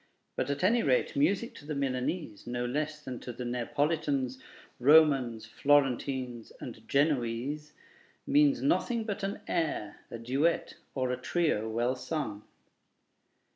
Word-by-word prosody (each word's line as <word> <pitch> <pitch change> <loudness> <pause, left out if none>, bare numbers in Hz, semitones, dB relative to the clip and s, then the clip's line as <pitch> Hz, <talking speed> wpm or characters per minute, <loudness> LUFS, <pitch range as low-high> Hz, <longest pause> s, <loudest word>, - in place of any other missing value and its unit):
But 130 - -1
at 140 +2 -2
any 230 +5 +4
rate, 130 -3 +1
music 190 +11 +1
to 145 - -12
the 150 - -3
Milanese, 130 - -2
no 120 0 -2
less 150 +4 -2
than 125 -2 -5
to 125 - -6
the 125 +1 -6
Neapolitans, 135 +1 -1 0.4
Romans, 135 -5 +5
Florentines, 130 -1 +1
and - - -8
Genoese, 140 +1 0 0.5
means 285 -1 +4
nothing 245 -5 +1
but 210 -1 -4
an 195 0 -3
air, 155 -10 -2
a - - -6
duet, 135 +8 0 0.2
or 130 -2 0
a 125 - -1
trio, 150 -11 0
well 120 +3 0
sung. 125 -7 -4
140 Hz, 135 wpm, -30 LUFS, 125-155 Hz, 0.5 s, Romans